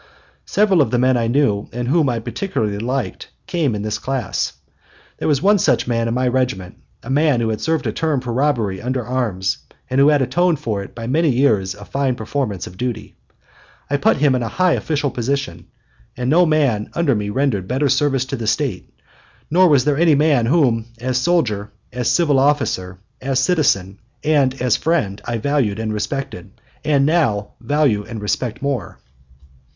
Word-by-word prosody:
Several 195 -5 +3
of 140 - +2
the 125 - 0
men 130 +1 +3
I 115 -1 0
knew 115 -5 +1
and 120 +1 -4
whom 150 0 +2
I 120 - -1
particularly 110 - -3
liked 125 +4 -3 0.2
came 160 - 0
in 105 - -4
this 105 0 -2
class. 135 -1 -2 0.7
There - - -2
was 145 0 +1
one 205 +1 +4
such - - +2
man 115 -1 0
in 115 - -1
my 130 0 +1
regiment, 125 -8 -1 0.3
a 125 - -6
man 145 -2 +3
who 115 -1 0
had 110 -1 -3
served 160 -1 0
a - - 0
term 155 -4 0
for 120 -2 -5
robbery 120 -8 0
under 125 -1 -2
arms, 115 -7 -1 0.3
and 130 - +2
who 140 - +6
had 145 -2 +4
atoned 170 +7 +1
for 110 -8 -2
it 100 - -10
by 115 -1 -6
many 155 +6 +2
years 110 -8 +2
of 100 0 -12
fine 135 -2 0
performance 110 -4 -3
of 90 - -11
duty. 120 -1 -4 0.8
I 145 - +3
put 140 - +2
him 140 -1 +3
in 125 - 0
a 115 - -2
high 185 +7 +2
official 145 -3 -1
position, 135 +3 -3 0.5
and 125 +1 -1
no 175 +2 +5
man 140 -9 +1
under 170 -5 +2
me 105 -2 -2
rendered 105 -5 0
better 135 +3 0
service 135 -1 +1
to 135 - -4
the 115 -4 -5
State, 125 -8 -1 0.6
nor 180 +2 +5
was 140 -4 +4
there 145 -1 +1
any 165 -3 +5
man 140 -5 +3
whom, 120 -7 +2
as 125 +1 -1
soldier, 120 - 0 0.2
as 125 -1 -1
civil 150 -6 +3
officer, 95 -10 0 0.2
as 135 -1 0
citizen, 130 - +1 0.2
and 140 -4 +2
as 125 -3 +2
friend, 145 -13 -1
I 120 -1 -2
valued 125 -5 0
and 110 -1 -3
respected 115 -2 -5 0.2
and 145 -3 +2
now 115 -11 +1
value 145 -8 +1
and 115 +1 -7
respect 110 +4 -3
more. 140 -3 -3
130 Hz, 190 wpm, -19 LUFS, 110-145 Hz, 0.8 s, who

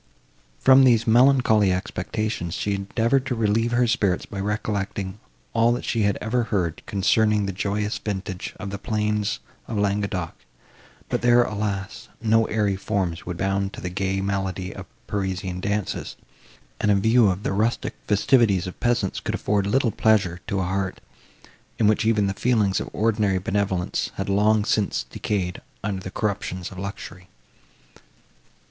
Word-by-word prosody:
From 130 - +6
these 115 -3 +4
melancholy 120 -4 +5
expectations 95 -1 -3
she 100 - -1
endeavoured 115 +7 +1
to 125 - -1
relieve 115 +1 +1
her 120 +1 +3
spirits 105 -7 +1
by 100 - -7
recollecting 100 -1 -3 0.3
all 115 +1 +4
that 120 - -4
she 115 - 0
had 100 -1 +2
ever 115 +2 0
heard, 90 -8 -1
concerning 105 +1 +2
the 100 - -2
joyous 105 +2 -2
vintage 95 -3 -5
of 100 -2 -5
the 100 - -5
plains 105 -1 -1 0.3
of 110 - -3
Languedoc; 100 -4 -1 0.7
but - - -1
there, 120 0 +5
alas! 100 -3 -4
no 115 0 +3
airy 105 -3 0
forms 95 -4 -2
would 90 -1 -4
bound 95 +1 -1
to - - -8
the 90 - -5
gay 95 +1 -1
melody 95 -1 -2
of - - -8 0.2
Parisian 95 -2 -3
dances, 100 +1 -2 0.6
and 105 - +1
a 105 - +5
view 110 +2 +4
of 95 +2 -2
the - - -1
rustic 110 +4 0
festivities 105 -3 +3
of 90 - -8
peasants 120 -6 0
could - - -3
afford 100 -1 0
little 120 +2 +2
pleasure 95 -7 +2
to 100 -1 -1
a - - 0
heart, 95 +1 -2 0.8
in 110 - +2
which 110 +1 +3
even 110 -3 +3
the 95 - 0
feelings 105 -3 +1
of - - -5
ordinary 105 -3 +1
benevolence 95 -1 -1
had 100 +1 -3
long 105 +1 +3
since 105 - 0
decayed 90 +8 -3 0.2
under 100 -2 -2
the 95 - -6
corruptions 95 -3 -3
of 95 - -9
luxury. 95 -2 -7
100 Hz, 155 wpm, -24 LUFS, 95-110 Hz, 0.8 s, From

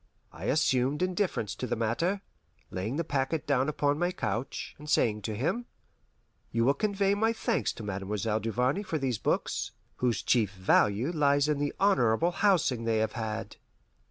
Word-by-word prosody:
I - - -8
assumed 140 +1 +2
indifference 185 - -1
to 125 - -4
the 120 - -1
matter, 165 - 0 0.5
laying 100 +8 -3
the 165 - 0
packet 140 +1 -1
down 135 0 +2
upon 145 0 0
my 175 +1 +1
couch, 135 -8 -3
and 150 +1 -9
saying 105 -7 +2
to 105 +1 -3
him, 195 - -1 0.8
"You 115 0 +1
will 135 - +5
convey 200 +1 +1
my 220 +3 +2
thanks 230 0 0
to 115 - -9
Mademoiselle 105 +2 -2
Duvarney 125 - 0
for 175 -6 -2
these 130 -6 -1
books, - - -1 0.2
whose 125 -2 0
chief 110 -5 +2
value 100 - +2
lies 145 -3 +3
in 150 -2 +1
the 145 0 -1
honourable 165 - +3
housing 170 - +2
they 115 -1 +2
have 110 0 +1
had." 110 -2 -4
135 Hz, 165 wpm, -29 LUFS, 115-165 Hz, 0.8 s, will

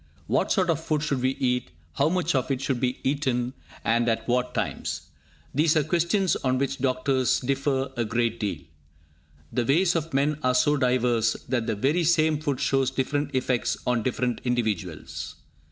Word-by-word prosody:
What - - +1
sort 185 -4 +3
of 160 0 -2
food 155 -2 0
should 140 -4 -1
we 130 +1 +1
eat, 125 -1 0 0.2
how 140 +3 +2
much 175 -1 0
of 130 -1 0
it 135 -2 0
should 135 -2 -1
be 125 0 0
eaten, 130 -3 0 0.3
and 120 +1 +2
at 115 0 -1
what 125 +1 0
times, - - -2 0.5
these 155 +3 +3
are 155 - +3
questions 175 +5 +1
on 130 -1 0
which 135 +1 -1
doctors 130 0 +1
differ 135 0 -1
a 120 - 0
great 115 +1 0
deal. 100 -8 -2 0.9
The 125 - +1
ways 170 +8 +3
of 165 0 -2
men 145 +2 +1
are 125 -2 +2
so 145 +4 +4
diverse, 125 -4 +2
that 120 -2 -1
the 110 - 0
very 145 - +1
same 155 -2 +3
food 145 -4 -1
shows 135 -1 +2
different 145 +1 -2
effects 125 -3 0
on 125 -2 +1
different 125 +1 -1
individuals. 110 -9 -2
130 Hz, 175 wpm, -26 LUFS, 125-150 Hz, 0.9 s, so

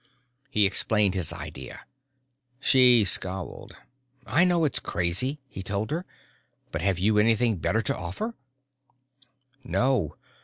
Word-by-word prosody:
_ - - -41 0.5
He 105 -7 +3
explained 100 0 +2
his 90 -5 -2
idea. 65 - -9 0.8
She 125 -5 +5
scowled. 95 -1 +1 0.5
"I 130 +11 +2
know 175 -3 +2
it's 145 - 0
crazy," 90 - -1
he 95 - -9
told 100 +3 -4
her, 170 +4 -3 0.6
"but - - -4
have 95 -2 0
you 105 +3 +2
anything 115 0 +2
better 110 +6 -1
to - - -1
offer?" 95 - -5 1.3
"No. 125 - 0
110 Hz, 125 wpm, -26 LUFS, 95-130 Hz, 1.3 s, She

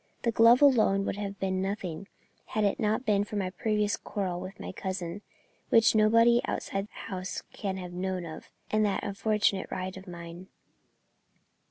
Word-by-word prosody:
The 235 - +2
glove 230 +4 +6
alone 215 -8 +5
would - - -2
have 200 -1 -5
been 190 -1 -1
nothing, 195 -2 -4 0.4
had 215 - -1
it 200 - +1
not 220 +4 0
been 205 -2 +3
for 210 - -7
my 190 -3 -1
previous 210 +1 0
quarrel 185 -4 -3
with 185 +1 -8
my - - -6
cousin 185 0 -4 0.5
which 225 -1 +5
no 215 -1 +5
one 235 +2 +5
outside 195 +1 -3
the 220 - -10
house 185 0 -4
can 195 -3 -3
have 180 -1 -7
known 185 0 -3
of 160 -1 -9 0.2
and 215 0 +3
that 205 -2 0
unfortunate 205 -1 0
ride 185 +1 -4
of 190 +1 -11
mine." 170 +1 -9
200 Hz, 175 wpm, -29 LUFS, 185-215 Hz, 0.5 s, glove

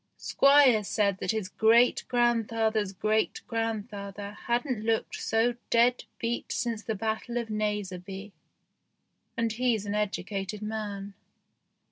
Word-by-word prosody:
Squire 275 -6 +5
said 200 -1 0
that - - -4
his 215 -2 0
great 230 +5 +4
grandfather's 225 -3 +1
great 215 +3 0
grandfather 205 -3 -4 0.2
hadn't 240 -1 0
looked 225 0 0
so 225 +2 +2 0.2
dead 240 +1 +3
beat 235 +1 -3
since 230 -2 -2
the 220 0 -3
battle 220 +3 -3
of 235 -2 -3
Naseby, 200 -2 -3 1.1
and 230 -1 +1
he's 230 -3 0
an 205 - -3
educated 205 0 -3
man. 205 -2 -4
220 Hz, 115 wpm, -28 LUFS, 205-235 Hz, 1.1 s, Squire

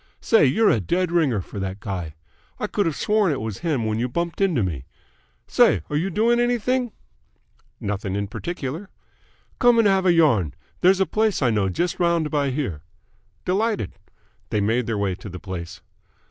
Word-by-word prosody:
Say, 225 -8 +4
you're 205 - +4
a 115 - +2
dead 175 - 0
ringer 145 - +2
for 100 - -8
that 95 0 -4
guy! 90 -7 -5 0.4
I - - -1
could 205 -4 0
have 160 - -1
sworn 210 -4 +2
it 140 - -2
was 110 -2 -5
him 150 -9 -1
when 110 0 -1
you 125 +2 -1
bumped 170 +7 -3
into 170 - +2
me. 75 -9 -3 0.6
Say, 80 - +3
are - - -1
you 170 +6 0
doing 230 +6 +2
anything?" 245 0 +1 0.9
"Nothing 100 -1 -3
in 100 0 -1
particular." 170 - -5 0.7
"Come 245 -2 +5
and 225 -2 +5
have 190 -1 +3
a - - +6
yarn. 125 - +3 0.2
There's 190 +2 +4
a - - +4
place 215 -1 0
I 120 - +3
know 100 -3 +1
just 175 - -2
round 170 -3 +1
by 145 -2 +1
here." 125 - -3 0.6
"Delighted." 200 - 0 0.6
They 105 - 0
made 115 +4 +1
their 115 -2 -1
way 100 -2 0
to 95 +3 -9
the 90 0 -8
place. 90 -2 -7
145 Hz, 185 wpm, -23 LUFS, -, 0.9 s, a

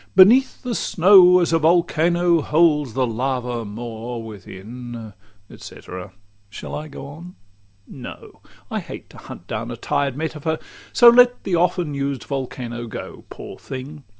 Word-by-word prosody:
beneath 245 +10 +5
the 250 -2 -3
snow, 180 -2 +6
As 170 -1 0
a 165 - +4
volcano 170 +1 +2
holds 150 -5 +2
the 130 -1 +2
lava 125 0 -2
more 115 +2 -6
Within 110 +2 -9 0.3
et - - -14
cætera. 90 +1 -9 0.4
Shall 110 - -9
I 155 +1 -5
go 140 -2 -9
on? 165 +6 -11 0.5
No! 130 - -11 0.3
I - - -1
hate - - -10
to - - -14
hunt 85 - -11
down 110 +3 -5
a 120 - -6
tired 140 +1 -1
metaphor, 160 0 -3 0.3
So 240 - +6
let 245 +1 +6
the 190 - -3
often 175 -2 +1
used 140 -1 -3
volcano 125 -3 -5
go. - - -9
Poor - - -10
thing! 135 +3 -8
140 Hz, 150 wpm, -21 LUFS, 120-170 Hz, 0.5 s, snow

